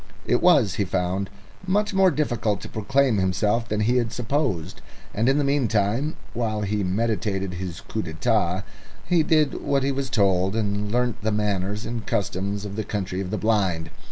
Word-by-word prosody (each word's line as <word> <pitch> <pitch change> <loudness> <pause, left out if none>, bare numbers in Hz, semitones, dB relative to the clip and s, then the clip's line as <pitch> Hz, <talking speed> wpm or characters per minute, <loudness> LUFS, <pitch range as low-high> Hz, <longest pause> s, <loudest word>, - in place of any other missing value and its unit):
It 120 - +2
was, 140 - +5
he 100 - +2
found, 95 +1 -1 0.4
much 205 +2 +1
more 190 -1 +5
difficult 120 - 0
to - - -7
proclaim 130 +2 +1
himself 105 +5 +1
than 105 0 0
he 120 +4 +2
had 120 -2 0
supposed, 120 - -2 0.3
and 115 +5 +2
in 135 - +3
the 145 - +2
meantime, 130 0 +1 0.2
while 110 -2 -1
he 105 0 -1
meditated 100 -1 -1
his 90 -2 -5
coup 110 - -4
d'état, 90 +1 0 0.4
he 175 -2 +3
did 155 -2 +2
what 140 -1 +1
he 140 - +1
was 135 -1 -2
told 95 -3 +2
and 105 -2 -1
learnt 125 0 0
the 110 +1 0
manners 105 0 -1
and 115 -1 -5
customs 100 +1 -1
of 100 0 -6
the 110 - -1
Country 95 -2 -3
of 90 - -4
the - - -2
Blind. 95 -7 0
105 Hz, 180 wpm, -24 LUFS, 95-125 Hz, 0.4 s, was